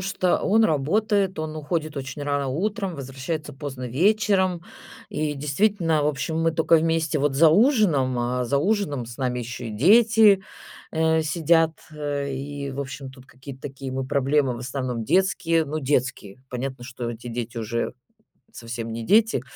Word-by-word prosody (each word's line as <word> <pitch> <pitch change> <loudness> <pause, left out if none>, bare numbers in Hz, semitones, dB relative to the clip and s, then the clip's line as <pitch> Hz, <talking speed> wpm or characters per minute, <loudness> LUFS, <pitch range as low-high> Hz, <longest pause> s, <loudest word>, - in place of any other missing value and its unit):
что 185 -1 +1
он 220 +3 +4
работает, 195 +6 +1
он 155 0 -4
уходит 155 0 -3
очень 135 +1 -5
рано 145 -1 -1
утром, 195 - -2
возвращается 140 +2 -5
поздно 135 -3 -6
вечером. 190 - +2 0.5
И 150 -1 -2
действительно, 160 +2 +1
в 145 - +1
общем, 150 +2 -2
мы 165 0 +2
тока 165 +1 +4
вместе 160 -1 +1
вот 140 -1 +1
за 160 +3 +6
ужином, 175 - +3
а 125 +1 -1
за 140 +3 +1
ужином 150 - 0
с 120 - -10
нами 125 -2 -1
ещё 120 +1 -6
и 115 - -5
дети, 210 - +5 0.5
э, 160 0 +2
сидят, 165 0 +2 0.2
э, 145 -2 -3
и, 140 +1 -5
в 135 - -5
общем, 135 0 -6
тут 130 0 -16
какие-то 130 +1 -12
такие 135 -1 -6
мы 130 0 -2
проблемы 140 -1 +1
в - - -7
основном 125 -2 -3
детские, 180 - +2
ну, 155 +1 -3
детские 130 -6 -1
Понятно, 130 0 -5
что 120 -1 -5
эти 120 +1 -9
дети 120 0 -5
уже 115 +1 -2 0.6
совсем 115 - -6
не 115 0 -5
дети. 215 - +3
145 Hz, 165 wpm, -24 LUFS, 130-165 Hz, 0.6 s, за